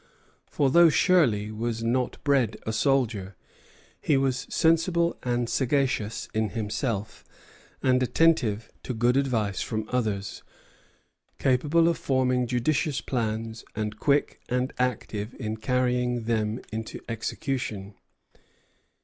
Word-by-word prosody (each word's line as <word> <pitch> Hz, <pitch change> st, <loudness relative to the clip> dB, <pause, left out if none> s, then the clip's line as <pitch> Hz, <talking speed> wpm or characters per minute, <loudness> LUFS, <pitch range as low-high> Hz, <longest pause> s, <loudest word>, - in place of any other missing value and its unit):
For 140 Hz, -3 st, +1 dB
though 170 Hz, +2 st, +7 dB
Shirley 125 Hz, -, +3 dB
was 115 Hz, +1 st, -3 dB
not 125 Hz, +2 st, 0 dB
bred 135 Hz, -7 st, +2 dB
a 110 Hz, -, -2 dB
soldier, 110 Hz, -6 st, 0 dB, 0.7 s
he 145 Hz, -, +2 dB
was 130 Hz, -2 st, 0 dB
sensible 170 Hz, +1 st, +2 dB
and 120 Hz, -1 st, -1 dB
sagacious 130 Hz, -5 st, 0 dB
in 110 Hz, -1 st, 0 dB
himself, 110 Hz, 0 st, -3 dB, 0.6 s
and 130 Hz, -1 st, +3 dB
attentive 125 Hz, -5 st, +2 dB
to 125 Hz, -, -5 dB
good 120 Hz, +3 st, +2 dB
advice 115 Hz, -8 st, 0 dB
from 110 Hz, -2 st, -3 dB
others, 105 Hz, -5 st, -2 dB, 1.0 s
capable 150 Hz, +6 st, +3 dB
of 170 Hz, -, +1 dB
forming 125 Hz, -2 st, +1 dB
judicious 130 Hz, +4 st, 0 dB
plans, 115 Hz, -2 st, -3 dB
and 105 Hz, 0 st, -3 dB
quick 145 Hz, -1 st, +1 dB
and 125 Hz, +1 st, -1 dB
active 120 Hz, -3 st, -2 dB
in 110 Hz, -3 st, -3 dB
carrying 125 Hz, 0 st, 0 dB
them 110 Hz, 0 st, -1 dB
into 110 Hz, 0 st, -5 dB
execution." 110 Hz, -3 st, -3 dB
125 Hz, 115 wpm, -26 LUFS, 110-135 Hz, 1.0 s, though